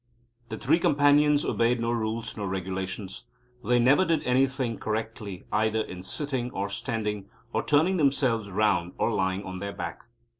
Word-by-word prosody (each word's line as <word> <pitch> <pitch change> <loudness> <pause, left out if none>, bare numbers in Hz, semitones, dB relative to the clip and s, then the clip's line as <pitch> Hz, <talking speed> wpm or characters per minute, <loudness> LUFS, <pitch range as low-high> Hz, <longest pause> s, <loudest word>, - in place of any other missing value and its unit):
The - - -4
Three 155 +6 +2
Companions 145 0 +4
obeyed 120 +1 +1
no 115 0 0
rules 115 0 -2
nor 100 -2 -3
regulations. 95 +2 -4 0.4
They 125 - +3
never 130 +8 +5
did 165 -4 +1
anything 130 -3 +1
correctly 110 -3 -4
either 110 +1 +1
in 90 -4 -7
sitting 130 +4 -3
or 100 -3 -3
standing 105 -1 -3 0.2
or - - +1
turning 160 +6 +3
themselves 130 - +1
round 95 -3 +1
or 115 - +1
lying 95 0 0
on 95 -1 -6
their 100 +1 -4
back. - - -6
115 Hz, 155 wpm, -27 LUFS, 100-135 Hz, 0.4 s, never